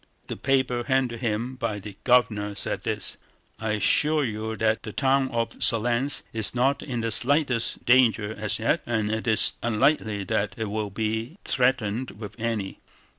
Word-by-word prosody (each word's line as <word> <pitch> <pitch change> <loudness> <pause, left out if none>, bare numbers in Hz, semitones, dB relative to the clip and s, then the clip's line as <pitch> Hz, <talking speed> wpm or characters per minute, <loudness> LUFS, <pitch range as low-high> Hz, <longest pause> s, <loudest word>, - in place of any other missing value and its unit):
The - - -3
paper 130 -3 0
handed 130 -3 +1
to - - -11
him 115 +4 -2
by 115 -4 -2
the 105 0 -9
Governor 105 -5 +2
said - - -1
this: - - -1 0.4
"I 110 -1 -1
assure 150 +8 +2
you 110 -2 -3
that 110 0 +1
the 110 - -7
town 135 +2 +1
of 115 -1 -1
Smolénsk 120 +4 +2
is 110 +1 -2
not 135 +3 +2
in 125 -4 -4
the 115 0 -1
slightest 130 0 +1
danger 115 -4 +4
as 105 -1 +1
yet 115 +9 +1
and 110 -3 0
it 110 +2 -3
is 110 -2 +3
unlikely 110 -3 +1
that 100 +3 -1
it 110 -2 -3
will 105 -1 -2
be 110 - -3
threatened 125 -4 0
with 105 -2 -7
any. 110 -4 -3
115 Hz, 170 wpm, -25 LUFS, 110-130 Hz, 0.4 s, danger